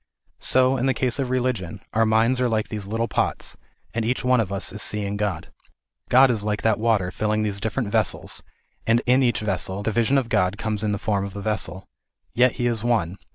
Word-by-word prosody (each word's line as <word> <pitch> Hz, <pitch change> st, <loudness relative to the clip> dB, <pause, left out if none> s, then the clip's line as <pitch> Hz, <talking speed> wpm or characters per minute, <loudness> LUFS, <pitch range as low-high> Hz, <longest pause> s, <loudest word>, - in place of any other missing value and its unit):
So, 130 Hz, +1 st, +3 dB
in 130 Hz, +2 st, 0 dB
the 130 Hz, -, +2 dB
case 125 Hz, +2 st, 0 dB
of 135 Hz, -2 st, -1 dB
religion, 125 Hz, -9 st, -1 dB
our 110 Hz, +1 st, +3 dB
minds 115 Hz, +4 st, +3 dB
are 125 Hz, -, +2 dB
like 110 Hz, -1 st, -1 dB
these 105 Hz, -3 st, -5 dB
little 115 Hz, +2 st, -1 dB
pots, -, -, -1 dB, 0.4 s
and 115 Hz, 0 st, -1 dB
each 125 Hz, +3 st, -1 dB
one 125 Hz, -1 st, +3 dB
of 100 Hz, -4 st, -1 dB
us 100 Hz, 0 st, -2 dB
is 105 Hz, -, -4 dB
seeing 105 Hz, -1 st, -1 dB
God. 100 Hz, -5 st, -3 dB, 0.6 s
God 130 Hz, +1 st, +6 dB
is 110 Hz, -4 st, -2 dB
like 105 Hz, 0 st, -2 dB
that 110 Hz, 0 st, +2 dB
water 110 Hz, -5 st, +1 dB
filling 110 Hz, +2 st, 0 dB
these 100 Hz, -2 st, -1 dB
different 110 Hz, +1 st, -2 dB
vessels, -, -, -1 dB, 0.5 s
and 115 Hz, +1 st, +3 dB
in 125 Hz, +2 st, +4 dB
each 120 Hz, -4 st, +2 dB
vessel 95 Hz, -1 st, -2 dB
the 110 Hz, -, 0 dB
vision 115 Hz, +5 st, +2 dB
of 130 Hz, -3 st, 0 dB
God 90 Hz, -4 st, +1 dB
comes 110 Hz, -1 st, -2 dB
in 105 Hz, -, +1 dB
the 100 Hz, -, 0 dB
form 100 Hz, -1 st, -1 dB
of 100 Hz, -1 st, -6 dB
the -, -, -4 dB
vessel. 95 Hz, -3 st, -3 dB, 0.5 s
Yet 125 Hz, 0 st, +4 dB
He 120 Hz, -, -2 dB
is 115 Hz, -2 st, 0 dB
one. 105 Hz, -7 st, 0 dB
110 Hz, 220 wpm, -23 LUFS, 100-120 Hz, 0.6 s, God